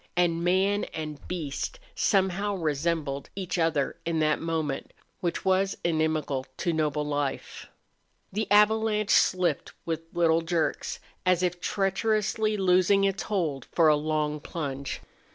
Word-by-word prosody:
And 170 -1 +2
man 190 +3 +2
and 155 -2 -5
beast 170 - -4
somehow 195 0 +1
resembled 155 -3 -1
each 185 -2 -3
other 160 -4 +1
in 165 -1 -1
that 155 -1 +2
moment 160 -4 -2 0.3
which 175 -2 -2
was 190 +1 +2
inimical 155 -5 0
to 170 -2 0
noble 150 -1 0
life. 145 -2 -3 0.7
The 215 +1 -2
avalanche 210 0 +4
slipped 180 -1 +2
with 165 -1 -2
little 165 -1 +3
jerks, 165 -1 -1 0.2
as 180 -1 +2
if 180 0 -1
treacherously 215 +2 0
loosing 190 +1 +4
its 195 -1 +1
hold 160 - -2
for 165 -2 +3
a 150 - +6
long 150 0 -1
plunge. 140 -3 -5
170 Hz, 130 wpm, -27 LUFS, 155-195 Hz, 0.7 s, a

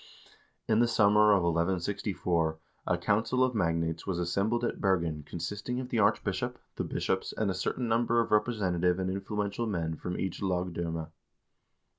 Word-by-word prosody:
In 110 0 +3
the 120 - +4
summer 105 -1 +5
of 100 -3 +4
1164 85 -1 0 0.3
a - - +2
council 115 +5 +1
of 130 -1 +1
magnates 85 -4 -1
was 95 -3 -1
assembled 100 +7 0
at 120 - -2
Bergen 85 -6 +1
consisting 105 - -4
of 130 -1 -5
the 120 - 0
arch 100 - +3
bishop, - - -2 0.2
the - - -2
bishops, - - -2
and 105 -3 +1
a - - -1
certain 105 +6 -2
number 115 +1 +2
of 115 - 0
representative 95 -6 +2
and 95 0 -1
influential 105 +3 -2
men 85 -6 -2
from 90 - -4
each 95 -2 -3
lagdfimme. 85 -4 -2
95 Hz, 160 wpm, -30 LUFS, 85-110 Hz, 0.3 s, summer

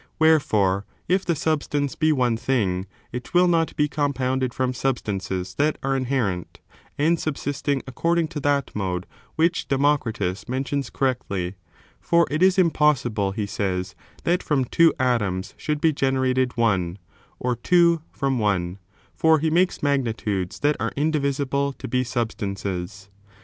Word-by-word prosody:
Wherefore, 105 -12 +3 0.2
if 185 +1 +2
the 170 - +1
substance 145 -2 -1
be 155 -1 +2
one 125 -5 +2
thing, 100 -7 0 0.2
it 125 +7 -7
will 180 +1 +6
not 165 -2 +1
be 150 - +2
compounded 130 -3 -1
from 130 +1 -1
substances 100 -8 -2
that 150 +1 +2
are 135 0 +1
inherent, 120 - -2 0.4
and 160 +3 +2
subsisting 145 -2 -2
according 165 +5 0
to 150 - -5
that 140 -1 0
mode 90 -3 -2 0.3
which 170 +2 +1
Democritus 130 -8 0
mentions 135 +1 -2
correctly; 100 -9 -1 0.5
for 170 0 +3
it 155 +3 -1
is 190 0 +5
impos 150 -7 +3
sible, 100 -4 -1
he 105 -2 -1
says, 95 -2 -2 0.3
that 175 +1 +1
from 135 -4 +1
two 165 +6 +4
atoms 105 -7 0
should 150 -1 -2
be 160 0 +3
generated 130 -2 +1
one, 95 -6 +1 0.4
or 125 -1 -1
two 170 +5 +3
from 135 -2 -1
one, 95 -3 0 0.3
for 160 0 +4
he 155 +1 0
makes 180 0 +2
magnitudes 115 -9 -1
that 145 +1 +3
are - - -2
indivi 150 -1 +1 0.2
sible 140 +1 -1
to - - -6
be 125 -1 +1
substances. 100 -6 -4
130 Hz, 145 wpm, -24 LUFS, 105-150 Hz, 0.5 s, will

